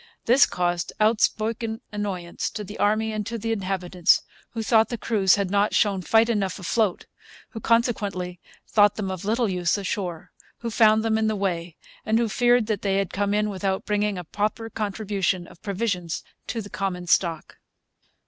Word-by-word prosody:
This 250 +4 +6
caused 175 -1 -1
outspoken 220 +1 +1
annoyance 195 -4 -3
to 210 - -6
the 205 +2 -9
army 215 +1 +1
and 215 -1 -2
to 230 +1 -3
the 225 +1 -3
inhabitants, 185 -4 +1 0.3
who 225 -1 -3
thought 220 0 +4
the 240 - -3
crews 205 -5 +3
had 200 -3 -2
not 205 +1 +2
shown 200 -3 +2
fight 225 +5 +4
enough 200 -5 -1
afloat, 200 0 0 0.4
who 225 - -7
consequently 205 -7 0 0.3
thought 205 -1 +4
them 195 -3 -3
of 185 0 -6
little 230 +3 +1
use 180 -1 0
ashore, 185 -4 -4 0.3
who 235 -1 -3
found 220 -1 +4
them 220 -1 +2
in 220 - +1
the 215 - 0
way, 175 -4 -2 0.3
and 220 +1 +1
who 230 -1 +1
feared 245 0 +3
they 205 -2 -1
had 195 -2 -1
come 200 +1 0
in 210 0 +1
without 190 0 -2
bringing 210 -1 0
a 180 - -5
proper 215 +6 -3
contribution 200 -4 -1
of 170 - -16
provisions 190 -5 -2 0.2
to 225 -2 -3
the 205 - -10
common 185 -2 -3
stock. 170 -2 0
205 Hz, 175 wpm, -24 LUFS, 185-220 Hz, 0.4 s, This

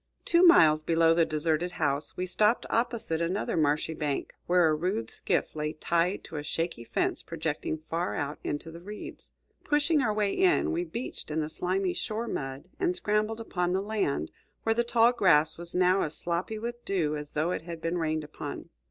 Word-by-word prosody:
Two 340 0 +4
miles 160 - +7
below 165 +1 +4
the 165 0 +4
deserted 160 +3 0
house, 140 -2 -1
we 180 - -1
stopped 210 +5 +2
opposite 225 -8 0
another 180 +5 -1
marshy 155 0 +1
bank, 150 -3 -3
where 175 -1 +5
a 155 - +3
rude 185 +8 -1
skiff - - -1
lay 150 0 -2
tied 170 +4 0
to 160 - -8
a 145 - -4
shaky 165 -3 -3
fence 115 - -1
projecting 160 -1 -3
far 170 +2 -1
out 145 +1 -3
into 145 +3 -4
the 170 +1 -10
reeds. 210 +4 -9 0.3
Pushing 295 +1 +2
our 230 -4 +1
way 210 -1 0
in, 360 -2 +3
we 340 +1 0
beached 255 -8 -6
in 155 +1 -1
the 155 -1 -2
slimy 185 +2 -1
shore 220 +2 -3
mud 135 0 -4
and 365 -1 +1
scrambled 215 -7 0
upon 180 -5 -1
the 190 - +2
land, 200 - -1 0.3
where 225 - +2
the 235 +1 +1
tall 235 0 +4
grass 160 -9 +4
was 170 0 -6
now 185 +1 +4
as 155 - -3
sloppy 175 +5 -2
with 240 +2 -5
dew 165 -6 0
as 150 -1 -7
though 155 +4 0
it - - -2
had 165 0 -7
been 165 +2 -1
rained 155 -1 -1
upon. 150 - -7
175 Hz, 195 wpm, -28 LUFS, 155-215 Hz, 0.3 s, miles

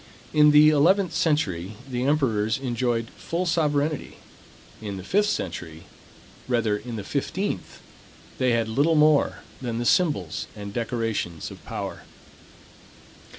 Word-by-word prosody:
In 150 0 +6
the 150 +1 +7
eleventh 175 +5 +3
century 110 - 0
the 125 -1 -2
emperors 115 -7 +1
enjoyed 120 -3 -1
full 175 +2 -3
sovereignty: 150 -3 0 0.6
In 100 -2 -5
the 95 - -7
fifteenth 90 - -1 2.6
they 130 -1 +3
had 115 -1 +1
little 140 +9 +2
more 150 -1 +3 0.2
than 120 -3 -3
the 120 - -2
symbols 145 - +1
and 100 -1 -7
decorations 115 -8 -3
of - - -12
power. - - -5
130 Hz, 105 wpm, -25 LUFS, 110-155 Hz, 2.6 s, the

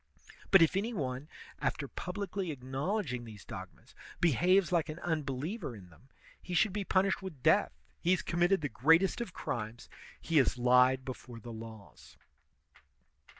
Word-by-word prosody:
But 195 -4 +8
if 165 - +2
any 220 +5 -1
one, 135 -2 -3 0.3
after 145 -3 -2
publicly 190 +3 -4
acknowledging 135 - -3
these 110 -4 -11
dogmas, - - -10 0.3
behaves 175 +3 +3
like 170 -3 +1
an 155 - -5
unbeliever 155 - -3
in 90 -4 -13
them, 125 +11 -21 0.3
he 180 - -5
should 195 +2 +3
be 205 -1 -2
punished 190 +1 +1
with 170 -9 -8
death; 70 - +3 0.2
he 170 - 0
has 185 -1 +3
committed 175 +2 +2
the 145 - -2
greatest 165 - +3
of 235 - -4
crimes, 115 -7 -5 0.3
he 165 - 0
has 130 -2 +4
lied 125 +1 +4
before 125 -2 -8
the 115 +1 -9
laws. 110 -2 -11
155 Hz, 150 wpm, -32 LUFS, 125-185 Hz, 0.3 s, But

